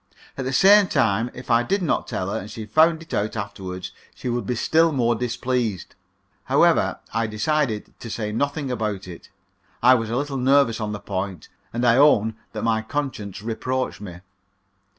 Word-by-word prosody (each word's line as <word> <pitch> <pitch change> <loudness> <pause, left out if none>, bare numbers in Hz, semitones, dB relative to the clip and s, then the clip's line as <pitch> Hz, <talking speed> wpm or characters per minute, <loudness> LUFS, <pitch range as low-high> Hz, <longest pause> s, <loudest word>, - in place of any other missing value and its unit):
At 135 - -4
the 130 - -1
same 200 +7 +6
time, 115 - +1
if 125 -1 -6
I 115 0 +5
did 190 +11 -1
not 165 - 0
tell 95 +1 -3
her, - - -2
and 100 - -9
she 110 0 -7
found 160 +8 +3
it 165 - -12
out 110 +2 -1
afterward, 95 -3 -6 0.3
she 125 - -5
would 120 -4 -2
be 125 - -1
still 160 +7 +3
more 120 -4 +2
displeased. 120 -4 -2 0.5
However, - - +3 0.2
I 115 0 0
decided 110 +1 -1
to 115 - -8
say 105 -1 -3
nothing 140 +4 -2
about 105 -5 -3
it. 85 -2 -11 0.5
I 125 +1 +8
was 115 -3 0
a 120 - -1
little 140 0 -2
nervous 130 -3 +3
on 105 -1 -2
the 105 - -5
point, 95 -3 -5 0.2
and 120 +1 -1
I 120 0 +5
own 110 -7 +4 0.2
that 110 - -4
my 110 -1 +1
conscience 110 -6 -4
reproached 125 +2 -3
me. 90 -4 -9
115 Hz, 185 wpm, -23 LUFS, 105-135 Hz, 0.5 s, I